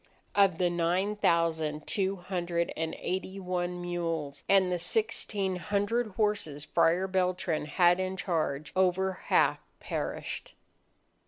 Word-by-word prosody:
Of 195 -4 +4
the 175 -1 +2
nine 175 +4 +1
thousand 160 -5 +1
two 195 -1 0
hundred 175 -2 -2
and 160 0 -2
eighty 190 +2 -3
one 180 -1 -2
mules 165 -5 -3
and 190 -2 +5
the 180 - 0
sixteen 200 -1 0
hundred 205 +5 0
horses 205 -9 0
Friar 175 +3 +3
Beltran 180 -4 0
had 175 +3 +4
in 185 0 -2
charge, 155 -5 -2
over 190 0 +2 0.2
half - - +4 0.2
perished. - - -4
180 Hz, 120 wpm, -30 LUFS, 170-190 Hz, 0.2 s, and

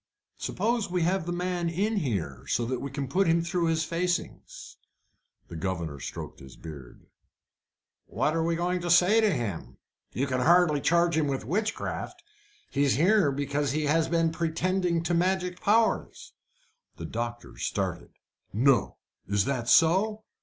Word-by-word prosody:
"Suppose 230 -2 -1
we 180 -1 0
have 180 0 0
the - - -1
man 175 -1 -1
in 205 +6 -1
here, 120 - -3
so 120 - 0
that 125 +1 -2
we 140 - -4
can 135 0 -4
put 185 +8 +1
him 165 0 +3
through 170 0 0
his 160 -1 +1
facings?" 175 +2 -4 0.7
The - - -9
governor 85 -4 -3
stroked - - -7
his 65 0 -13
beard 70 -6 -11 1.0
"What 155 - 0
are 165 - +1
you 165 - 0
going 180 +1 -1
to 175 - -3
say 180 +6 +5
to 215 -2 +3
him? 95 - -4 0.3
You 135 - -1
can 130 -2 -1
hardly 165 -1 +4
charge 170 +1 +3
him 155 -2 +1
with 135 -5 -3
witchcraft. 210 - -3 0.5
He 140 - 0
is 140 - +3
here 180 - +4
because 140 0 -1
he 155 +1 0
has 160 +2 +2
been 165 -1 +2
pretending 170 +1 0
to 175 +1 -1
magic 180 +1 0
powers." 220 +2 +1 0.6
The - - -6
doctor 120 +1 -5
started. - - -3 0.4
"No! 125 +2 +2 0.3
Is 100 0 +1
that 125 -4 -2
so? 200 +6 +4
165 Hz, 160 wpm, -27 LUFS, 135-180 Hz, 1.0 s, say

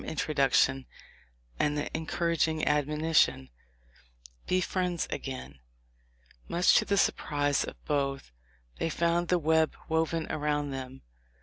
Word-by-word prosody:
227 160 -2 -5 0.2
introduction 135 0 +3 0.7
and 150 0 +1
the 145 - -3
encouraging 160 -1 0
admonition, 150 - +2 1.0
"Be 185 - +2
friends 180 -2 -1
again." 130 - -6 0.9
Much 175 +1 +3
to - - +2
the 200 - +1
surprise 145 -6 +1
of - - -7
both 140 - -2 0.5
they - - 0
found 170 +2 0
the 180 - +3
web 160 -1 +2
woven 160 0 0
around 145 -1 -1
them. 130 0 -7
150 Hz, 115 wpm, -29 LUFS, 140-165 Hz, 1.0 s, introduction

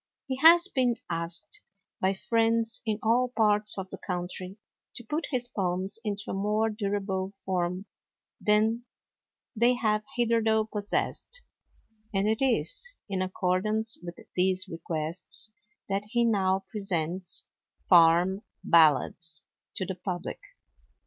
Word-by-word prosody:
He 260 -1 -3
has 340 +5 +7
been 255 -8 +1 0.2
asked, 170 +4 -3 0.4
by 190 +1 +1
friends 225 +2 +2
in 215 -1 0
all 245 +3 +2
parts 210 -1 +3
of 190 -1 -6
the - - -7
country, 180 +1 -5 0.4
to 240 - -6
put 300 +8 -3
his 245 -3 +1
poems 190 -1 -2
into 205 -1 -3
a - - -3
more 210 +3 0
durable 200 -2 -2
form 180 0 -1 0.6
than 220 +3 +2 0.7
they 240 +3 +4
have 215 -3 0
hitherto 225 -2 +2
possessed; 210 - -2 0.7
and 195 0 0
it 220 +3 0
is 485 - 0
in 195 -2 -2
accordance 190 +4 -1
with 175 -1 -8 0.2
these 185 0 +2
requests 165 +5 +1 0.4
that 195 +1 -2
he 235 +1 +2
now 195 -3 +1
presents 185 -3 -1 0.4
"Farm 175 +2 +5 0.2
Ballads" 160 0 +3 0.3
to 190 - -2
the 190 - -3
public. 180 0 -5
205 Hz, 120 wpm, -28 LUFS, 185-225 Hz, 0.7 s, has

